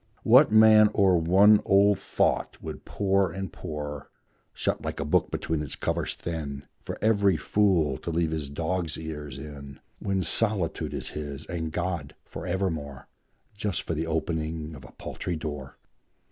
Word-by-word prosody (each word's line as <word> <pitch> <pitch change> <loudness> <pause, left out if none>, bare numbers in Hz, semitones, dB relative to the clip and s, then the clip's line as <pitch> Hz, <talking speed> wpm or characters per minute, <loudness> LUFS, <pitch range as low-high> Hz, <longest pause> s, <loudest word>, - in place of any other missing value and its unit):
What 125 +3 +6
man 110 -1 +7
o'er 95 -3 +4
one 95 +6 +5
old 100 0 +4
thought - - 0
would - - -8
pore 100 -2 +1
and 95 0 -6
pore, 75 -2 -6 0.4
Shut - - -2
like - - -5
a 70 - -2
book 75 - +2
between 80 -1 -2
its 75 - -4
covers - - -2
thin 75 -5 -5 0.2
For - - -5
every 100 -5 +3
fool 85 -5 +2
to - - -5
leave 80 -1 0
his 80 -3 -3
dog's 80 +2 -2
ears 75 -4 -6
in, 70 -1 -9 0.2
When 95 -1 -1
solitude 100 -1 0
is - - -5
his, 75 -1 -6
and 80 -2 -4
God 85 -4 -3
for 80 +4 -8
evermore, 80 -7 -3 0.5
Just 100 -4 -2
for - - -3
the 80 +1 -2
opening 80 -1 -2
of 65 -3 -11
a - - -13
paltry 90 - -5
door? 75 -4 -6
80 Hz, 160 wpm, -27 LUFS, 75-95 Hz, 0.5 s, man